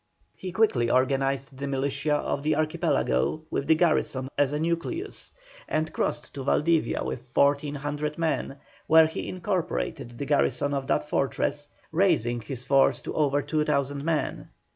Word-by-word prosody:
He 185 - -6
quickly 170 - +2
organised 135 +1 +1
the 140 +1 -4
militia 140 +2 0
of 145 -1 -1
the 155 +1 +1
Archipelago, 155 - 0
with 140 - -2
the 160 - +6
garrison 155 -5 +1
as 145 -1 +2
a 150 - -1
nucleus, 170 - -3 0.4
and 155 +1 -1
crossed - - -2
to 135 - -5
Valdivia 160 +4 +1
with 65 0 -5
1,400 145 +1 0
men, 160 -4 -1 0.3
where 160 0 +7
he 160 - -4
incorporated 160 - -3
the 140 - -4
garrison 145 0 +1
of 135 -1 -2
that - - 0
fortress, 145 +1 -1 0.2
raising 155 - +2
his 125 +2 -6
force 135 +1 +4
to - - -5
over 145 -2 +1
2,000 145 -2 0
men. 160 -1 -2
145 Hz, 145 wpm, -26 LUFS, 135-155 Hz, 0.4 s, where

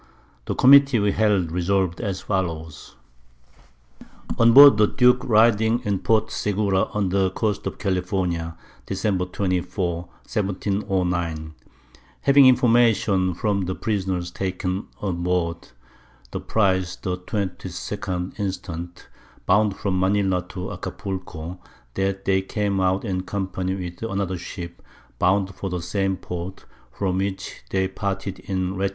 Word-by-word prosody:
The - - -2
Committee 140 0 +7
we 100 -1 +2
held 100 -6 +1
resolv'd 90 +1 0
as 95 -4 -3
follows. 80 -5 -4 1.4
On 115 0 +6
board 140 -1 +10
the 105 0 +5
Duke 125 +1 +3
riding 110 0 +4
in 100 -2 0
Port 110 +2 +1
Segura 100 -2 +1
on 100 -3 -2
the 95 0 +2
Coast 105 +2 -2
of - - -5
California, 90 -3 -2 0.3
Dec. 95 -2 -1
24. 90 -2 -1 0.3
1709. 90 -6 -2 0.7
Having 140 0 +6
Information 115 -7 +3
from 100 0 0
the 95 +1 -3
Prisoners 95 -5 -2
taken 95 +1 -3
on 90 -4 -2
board 85 -2 -1 0.6
the - - -3
Prize 95 -4 +1
the 90 -2 -4
22d 95 0 -4
instant, 90 -3 -5 0.4
bound 100 +1 +3
from 95 -2 -1
Manila 95 -1 +2
to 90 -1 -6
Acapulco, 90 -2 -6 0.3
_that 95 +2 -1
they 95 -1 +3
came 100 0 -1
out 95 +3 +1
in 95 -3 -1
company 95 -1 -3
with 90 -2 -7
another 95 -4 -2
Ship 85 -1 -8 0.4
bound 95 +1 +2
for 95 +1 -5
the 90 -1 -3
same 95 0 -1
Port 90 +2 -7 0.3
from 95 +7 -1
which 95 0 -4
they 95 -1 +1
parted 95 0 -4
in 95 -1 -2
Lat. 100 0 +1
95 Hz, 125 wpm, -23 LUFS, 90-100 Hz, 1.4 s, board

